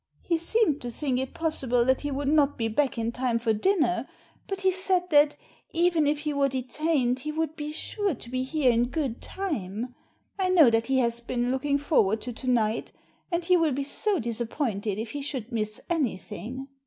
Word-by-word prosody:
He 335 Hz, -2 st, 0 dB
seemed 340 Hz, -4 st, +1 dB
to 245 Hz, -, -4 dB
think 255 Hz, +1 st, -1 dB
it 265 Hz, 0 st, -4 dB
possible 260 Hz, -7 st, +1 dB
that 260 Hz, +1 st, +2 dB
he 290 Hz, -, -2 dB
would 280 Hz, 0 st, -2 dB
not 290 Hz, -1 st, +3 dB
be 225 Hz, -, 0 dB
back 260 Hz, +4 st, 0 dB
in 230 Hz, 0 st, -1 dB
time 245 Hz, -1 st, 0 dB
for 230 Hz, -1 st, +1 dB
dinner, 245 Hz, -, +1 dB, 0.4 s
but 390 Hz, -1 st, -4 dB
he 380 Hz, 0 st, +4 dB
said 370 Hz, -1 st, +1 dB
that, 295 Hz, 0 st, +5 dB, 0.4 s
even 335 Hz, -3 st, +3 dB
if 295 Hz, 0 st, +1 dB
he 300 Hz, -1 st, -2 dB
were 280 Hz, -1 st, +2 dB
detained, 260 Hz, 0 st, 0 dB
he 305 Hz, +4 st, -3 dB
would 315 Hz, 0 st, -2 dB
be 300 Hz, -1 st, -5 dB
sure 390 Hz, +3 st, -2 dB
to 235 Hz, -, -10 dB
be 255 Hz, 0 st, -1 dB
here 265 Hz, -1 st, +2 dB
in 235 Hz, +1 st, +2 dB
good 270 Hz, -6 st, -2 dB
time. 245 Hz, -, -4 dB, 0.5 s
I 375 Hz, -1 st, +1 dB
know 325 Hz, -9 st, +6 dB
that 225 Hz, 0 st, +1 dB
he 265 Hz, 0 st, +2 dB
has 235 Hz, -2 st, +1 dB
been 240 Hz, +1 st, -1 dB
looking 280 Hz, +2 st, +1 dB
for 290 Hz, +2 st, +3 dB
ward 210 Hz, +3 st, -1 dB
to 245 Hz, -, -5 dB
to 255 Hz, +3 st, -4 dB
night, 225 Hz, -2 st, +1 dB, 0.4 s
and 340 Hz, 0 st, -1 dB
he 365 Hz, +1 st, +5 dB
will 320 Hz, -4 st, +2 dB
be 275 Hz, +2 st, -1 dB
so 405 Hz, +8 st, +1 dB
disappointed 225 Hz, -, -2 dB
if 220 Hz, +1 st, -4 dB
he 290 Hz, -, -4 dB
should 265 Hz, -4 st, -5 dB
miss 215 Hz, -2 st, -2 dB
anything." 260 Hz, -, -3 dB
270 Hz, 205 wpm, -27 LUFS, 235-315 Hz, 0.5 s, know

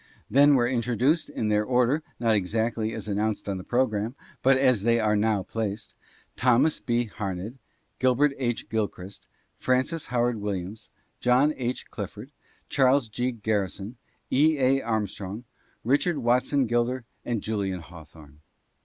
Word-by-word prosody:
Then 145 Hz, +2 st, +6 dB
were 120 Hz, -2 st, +3 dB
introduced 125 Hz, +5 st, +1 dB
in 110 Hz, -, -2 dB
their 105 Hz, 0 st, +2 dB
order, 125 Hz, +5 st, +2 dB, 0.2 s
not 115 Hz, -2 st, +2 dB
exactly 110 Hz, +3 st, 0 dB
as -, -, -6 dB
announced 105 Hz, +1 st, -1 dB
on 95 Hz, -2 st, -2 dB
the -, -, -8 dB
programme, 115 Hz, -1 st, 0 dB, 0.3 s
but 135 Hz, 0 st, +5 dB
as 130 Hz, -5 st, +3 dB
they 115 Hz, +2 st, +3 dB
are 105 Hz, -1 st, +2 dB
now 105 Hz, -2 st, +1 dB
placed, 110 Hz, -1 st, -4 dB, 0.4 s
Thomas 130 Hz, +5 st, +3 dB
B. 120 Hz, 0 st, 0 dB
Harned, 105 Hz, +3 st, -5 dB, 0.4 s
Herbert 130 Hz, +3 st, +3 dB
H. 120 Hz, -3 st, -2 dB
Gilchrist, 100 Hz, -3 st, -4 dB, 0.3 s
Francis 130 Hz, +6 st, 0 dB
Howard 120 Hz, -1 st, 0 dB
Williams, 100 Hz, 0 st, -5 dB, 0.3 s
John 130 Hz, +5 st, +3 dB
H. 125 Hz, 0 st, -4 dB
Clifford, 105 Hz, +5 st, -7 dB, 0.4 s
Charles 130 Hz, -2 st, +3 dB
G. 120 Hz, +4 st, -1 dB
Garri 105 Hz, -4 st, -1 dB
son, 105 Hz, +7 st, -8 dB, 0.3 s
E. 155 Hz, +3 st, +4 dB
A. 135 Hz, 0 st, +3 dB
Armstrong, 105 Hz, -1 st, -3 dB, 0.4 s
Richard 145 Hz, +7 st, +2 dB
Watson 125 Hz, +2 st, +2 dB
Gilder 120 Hz, +1 st, 0 dB, 0.2 s
and 120 Hz, -3 st, -2 dB
Julian 100 Hz, -4 st, -2 dB
Haw 85 Hz, 0 st, -12 dB
thorne. 75 Hz, -1 st, -17 dB
115 Hz, 145 wpm, -26 LUFS, 105-130 Hz, 0.4 s, Then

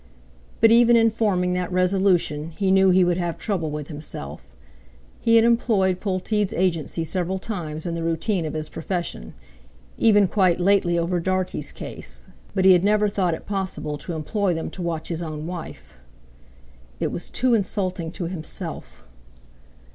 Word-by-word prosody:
But 225 Hz, 0 st, +7 dB
even 235 Hz, +1 st, +6 dB
in 225 Hz, -1 st, +5 dB
forming 190 Hz, -5 st, +1 dB
that 180 Hz, 0 st, -2 dB
resolution 180 Hz, -4 st, +1 dB
he 195 Hz, -2 st, +1 dB
knew 190 Hz, 0 st, +5 dB
he 185 Hz, 0 st, +5 dB
would 175 Hz, -1 st, +1 dB
have 175 Hz, -2 st, -2 dB
trouble 185 Hz, -7 st, -2 dB
with 150 Hz, -1 st, -5 dB
himself. 70 Hz, -, -8 dB, 0.7 s
He 230 Hz, -, +3 dB
had 225 Hz, 0 st, +6 dB
employed 210 Hz, -6 st, +2 dB
Polteed's 200 Hz, +1 st, -1 dB
agency 165 Hz, -2 st, 0 dB
several 185 Hz, +2 st, -2 dB
times 170 Hz, -6 st, -5 dB
in 170 Hz, -, -2 dB
the 170 Hz, -, -3 dB
routine 165 Hz, +3 st, 0 dB
of 155 Hz, -, -5 dB
his 155 Hz, 0 st, -3 dB
profession, 165 Hz, -, -4 dB, 0.6 s
even 205 Hz, -3 st, +5 dB
quite 185 Hz, -3 st, +2 dB
lately 180 Hz, -2 st, +3 dB
over 170 Hz, +1 st, 0 dB
Dartie's 185 Hz, +1 st, -2 dB
case, -, -, -7 dB, 0.3 s
but 190 Hz, -1 st, +2 dB
he 190 Hz, -, +9 dB
had 180 Hz, 0 st, +3 dB
never 210 Hz, +1 st, +3 dB
thought 185 Hz, -4 st, 0 dB
it -, -, -12 dB
possible 190 Hz, -6 st, -3 dB
to 170 Hz, +3 st, -5 dB
employ 180 Hz, +4 st, -1 dB
them 160 Hz, -, -4 dB
to 185 Hz, -, -8 dB
watch 165 Hz, -2 st, -3 dB
his 165 Hz, -1 st, -3 dB
own 155 Hz, -2 st, -5 dB
wife. 165 Hz, -, -8 dB, 1.1 s
It -, -, -1 dB
was 175 Hz, -, -6 dB
too 255 Hz, -1 st, +1 dB
insulting 185 Hz, -5 st, -1 dB
to -, -, -5 dB
himself! 165 Hz, -2 st, -5 dB
180 Hz, 160 wpm, -23 LUFS, 165-200 Hz, 1.1 s, he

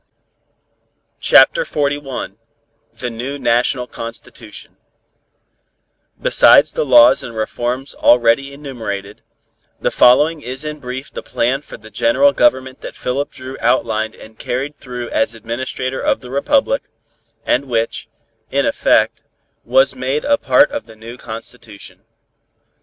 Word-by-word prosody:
CHAPTER -, -, +5 dB
XLI 145 Hz, -, -3 dB, 0.6 s
THE 125 Hz, -1 st, -6 dB
NEW 125 Hz, +5 st, -5 dB
NATIONAL 125 Hz, 0 st, +1 dB
CONSTITUTION 115 Hz, -1 st, -9 dB, 1.4 s
Besides -, -, +6 dB
the 485 Hz, -, -1 dB
laws 300 Hz, -8 st, +6 dB
and 115 Hz, -, -9 dB
reforms 120 Hz, +4 st, -3 dB
already 120 Hz, +3 st, +3 dB
enumerated, 110 Hz, -8 st, -7 dB, 0.6 s
the -, -, -1 dB
following 150 Hz, +6 st, +4 dB
is 130 Hz, +3 st, -6 dB
in 150 Hz, 0 st, -6 dB
brief 130 Hz, +1 st, -7 dB
the -, -, -6 dB
plan 130 Hz, +4 st, -1 dB
for -, -, -11 dB
the 110 Hz, +1 st, -15 dB
General 120 Hz, +6 st, +3 dB
Government 130 Hz, 0 st, +1 dB
that -, -, -8 dB
Philip 135 Hz, +3 st, -3 dB
Dru 130 Hz, +1 st, -9 dB
outlined 110 Hz, -3 st, 0 dB
and 110 Hz, 0 st, -15 dB
carried 135 Hz, +4 st, -3 dB
through 125 Hz, -4 st, -8 dB
as 140 Hz, -4 st, 0 dB
Administrator 130 Hz, +3 st, -4 dB
of -, -, 0 dB
the 125 Hz, -1 st, -11 dB
Republic, 285 Hz, -, +1 dB, 0.6 s
and 135 Hz, +3 st, +1 dB
which, 115 Hz, -3 st, -2 dB, 0.4 s
in -, -, 0 dB
effect, -, -, +2 dB, 0.4 s
was 135 Hz, +1 st, +3 dB
made 130 Hz, +3 st, -2 dB
a 285 Hz, 0 st, +2 dB
part 290 Hz, -, +4 dB
of 290 Hz, 0 st, -5 dB
the 110 Hz, -, -14 dB
new 115 Hz, +2 st, -10 dB
constitution. 115 Hz, -2 st, -9 dB
130 Hz, 125 wpm, -17 LUFS, 115-140 Hz, 1.4 s, Besides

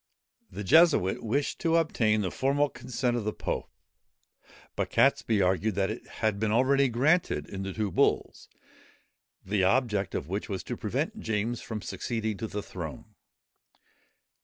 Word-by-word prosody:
] -, -, -60 dB
The 105 Hz, -, -6 dB
Jesuit 150 Hz, -, +4 dB
wished 135 Hz, +6 st, -1 dB
to 165 Hz, -1 st, +1 dB
obtain 110 Hz, -10 st, +2 dB
the 95 Hz, -, -2 dB
formal 140 Hz, +2 st, +1 dB
consent 125 Hz, -1 st, -2 dB
of 120 Hz, -, -2 dB
the 105 Hz, -, -1 dB
pope; -, -, -4 dB, 1.1 s
but -, -, -1 dB
Catesby 105 Hz, -4 st, +3 dB
argued 95 Hz, +3 st, +1 dB
that 95 Hz, +1 st, +1 dB
it 110 Hz, -, -8 dB, 0.2 s
had 105 Hz, -2 st, +1 dB
been 110 Hz, 0 st, 0 dB
already 135 Hz, +4 st, +4 dB
granted, 150 Hz, +10 st, +2 dB
in 95 Hz, -, -6 dB
the 95 Hz, 0 st, -4 dB
two 105 Hz, -1 st, -2 dB
bulls, -, -, 0 dB, 1.0 s
the 100 Hz, 0 st, +1 dB
object 105 Hz, -2 st, +1 dB
of 70 Hz, -, -3 dB
which 100 Hz, +6 st, -4 dB
was 95 Hz, -2 st, -3 dB
to -, -, -4 dB
prevent -, -, -3 dB
James 110 Hz, +2 st, -2 dB
from 110 Hz, -3 st, -6 dB
succeeding 110 Hz, +2 st, -3 dB
to 110 Hz, -, -4 dB
the 105 Hz, -1 st, -5 dB
throne. 80 Hz, -6 st, -8 dB
110 Hz, 160 wpm, -28 LUFS, 100-130 Hz, 1.1 s, Jesuit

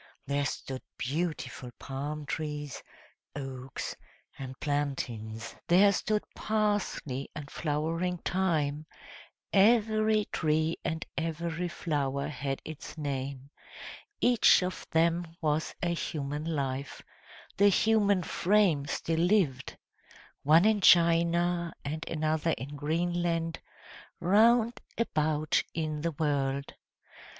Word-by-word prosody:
There 140 Hz, +1 st, 0 dB
stood 130 Hz, 0 st, -5 dB, 0.2 s
beautiful 150 Hz, -2 st, -3 dB
palm 145 Hz, +3 st, -5 dB
trees, 150 Hz, -2 st, -4 dB, 0.5 s
oaks, 135 Hz, -2 st, -5 dB, 0.4 s
and 130 Hz, -1 st, -8 dB
plantains; 120 Hz, -7 st, -3 dB
there 195 Hz, +4 st, +6 dB
stood 210 Hz, +2 st, 0 dB
parsley 205 Hz, -11 st, -1 dB
and 145 Hz, -1 st, -7 dB
flowering 165 Hz, +4 st, -1 dB
thyme: 155 Hz, -5 st, 0 dB, 0.7 s
every 215 Hz, 0 st, +4 dB
tree 155 Hz, +1 st, +1 dB
and 160 Hz, +1 st, -2 dB
every 165 Hz, +1 st, -2 dB
flower 140 Hz, -5 st, -2 dB
had 135 Hz, 0 st, -4 dB
its 155 Hz, 0 st, -8 dB
name; 140 Hz, -2 st, -4 dB, 0.7 s
each 245 Hz, -5 st, +5 dB
of 180 Hz, 0 st, -4 dB
them 165 Hz, +1 st, +1 dB
was 155 Hz, 0 st, 0 dB
a 175 Hz, -1 st, +1 dB
human 150 Hz, -3 st, -3 dB
life, 140 Hz, -4 st, -3 dB, 0.5 s
the 205 Hz, +1 st, +6 dB
human 205 Hz, -2 st, +3 dB
frame 175 Hz, -7 st, +2 dB
still 160 Hz, +3 st, -1 dB
lived 170 Hz, -8 st, +1 dB, 0.6 s
one 160 Hz, +6 st, +5 dB
in 215 Hz, -2 st, +3 dB
China, 170 Hz, 0 st, +4 dB
and 155 Hz, +3 st, -4 dB
another 155 Hz, 0 st, 0 dB
in 140 Hz, +5 st, -7 dB
Greenland 165 Hz, +2 st, -1 dB, 0.6 s
round 230 Hz, +5 st, +4 dB, 0.2 s
about 155 Hz, -8 st, +1 dB
in 155 Hz, -2 st, -2 dB
the 170 Hz, +1 st, -1 dB
world. 140 Hz, -2 st, -1 dB
160 Hz, 100 wpm, -30 LUFS, 145-175 Hz, 0.7 s, there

